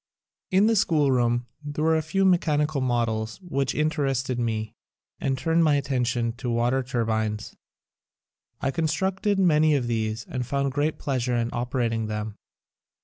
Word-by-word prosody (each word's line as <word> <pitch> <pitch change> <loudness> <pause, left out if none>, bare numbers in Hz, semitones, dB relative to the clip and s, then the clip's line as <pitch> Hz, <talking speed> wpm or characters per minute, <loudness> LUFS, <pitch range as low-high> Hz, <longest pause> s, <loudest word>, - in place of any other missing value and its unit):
In 190 +2 +4
the 225 +1 +3
schoolroom 130 - +2 0.2
there 145 +1 -3
were 160 0 +3
a 160 - +2
few 190 +5 0
me 180 -2 +5
chanical 150 -2 0
models 115 -3 -1
which 140 -7 -1
interested 135 -5 0
me 110 -2 -2 0.5
and 135 -1 -1
turned 165 +2 +2
my 150 -2 +4
attention 125 -4 0
to 125 - -4
water 120 +3 +1
turbines. 110 -4 -2 1.1
I 135 - 0
constructed 190 +6 0
many 155 -5 +4
of 130 -4 0
these 110 -1 -2
and 125 - -3
found 140 +2 -1
great 145 +3 0
pleasure 125 -3 -1
in 120 0 0
operating 120 -2 -1
them. 105 0 -4
130 Hz, 145 wpm, -25 LUFS, 120-155 Hz, 1.1 s, me